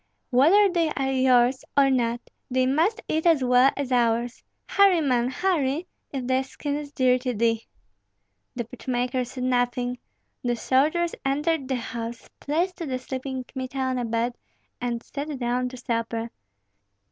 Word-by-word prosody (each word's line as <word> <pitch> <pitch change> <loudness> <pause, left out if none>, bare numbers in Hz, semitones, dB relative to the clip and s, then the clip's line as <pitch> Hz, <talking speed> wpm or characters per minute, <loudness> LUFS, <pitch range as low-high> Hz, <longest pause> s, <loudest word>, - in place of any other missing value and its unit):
"Whether 330 +12 +6
they 340 -4 +1
are 270 -1 0
yours 255 -1 +3
or 275 -1 +5
not, 240 -2 +1 0.3
they 255 0 +2
must 335 - +1
eat 320 +2 0
as 320 -6 +4
well 250 +1 +5
as 280 -2 -3
ours. 235 -1 +1 0.2
Hurry, 395 -3 +5
man, 250 -5 +1
hurry! 315 -1 0 0.3
if 265 -3 -4
thy 260 +1 +2
skin 285 +2 -4
is 290 -1 -5
dear 255 -3 +3
to 250 -1 -2
thee!" 230 +1 +1 0.9
The 240 -1 -3
pitch 250 +3 -13
maker 250 0 0
said 250 +1 -6
nothing. 245 0 0 0.4
The 245 -1 +1
soldiers 305 +8 +1
entered 290 +1 0
the 265 - 0
house, 235 -1 -5
placed 345 +5 -1
the 290 -8 -3
sleeping 260 0 -5
Kmita 260 +1 -7
on 260 -1 0
a 245 - -1
bed, 230 +2 -1 0.4
and 240 -1 -2
sat 290 0 -5
down 250 0 -1
to 255 - -10
supper. 230 -1 -3
255 Hz, 160 wpm, -25 LUFS, 245-285 Hz, 0.9 s, Whether